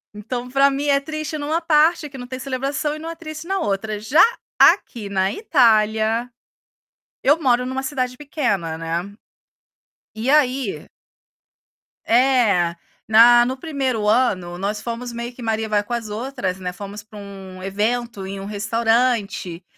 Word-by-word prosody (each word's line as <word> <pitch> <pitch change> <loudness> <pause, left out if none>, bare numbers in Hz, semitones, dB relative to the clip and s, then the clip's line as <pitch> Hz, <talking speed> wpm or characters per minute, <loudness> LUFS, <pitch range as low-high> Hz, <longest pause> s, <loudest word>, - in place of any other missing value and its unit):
Então, 240 +4 -5
pra 275 +2 +4
mim, 280 +1 -2
é 280 -1 +4
triste 310 +1 -5
numa 300 +3 -1
parte, 320 0 +3
que 275 -2 -11
não 245 - -7
tem 255 +1 -6
celebração, 275 +3 -2
e - - -8
não 325 +1 -6
é 330 - -6
triste 315 0 -8
na 390 +1 0
outra. 205 - -2
Já 260 +10 +3 0.4
aqui 215 -4 +4
na 190 0 +1
Itália, 225 - +2 0.9
eu 295 +4 +4
moro 250 -3 +2
numa 260 +1 -3
cidade 255 -2 -3
pequena, 205 - -2
né? 165 +4 -4 1.0
E 220 +3 -4
aí 265 -6 +1 1.2
é, 230 -9 +3 0.3
na 240 +2 +7
no 260 +2 -3
1º 260 -7 -2
ano 195 -7 +1
nós 205 +3 -3
fomos 235 +1 -5
meio 235 +1 -5
que 245 - -12
maria-vai-com-as-outras, 220 -1 -2
né? 180 -1 -4
Fomos 200 +2 -8
para 215 0 -14
um 195 -2 -10
evento 210 +1 -2
em 195 0 -6
um 195 - -7
restaurante, 225 -3 0
235 Hz, 145 wpm, -21 LUFS, 205-270 Hz, 1.2 s, na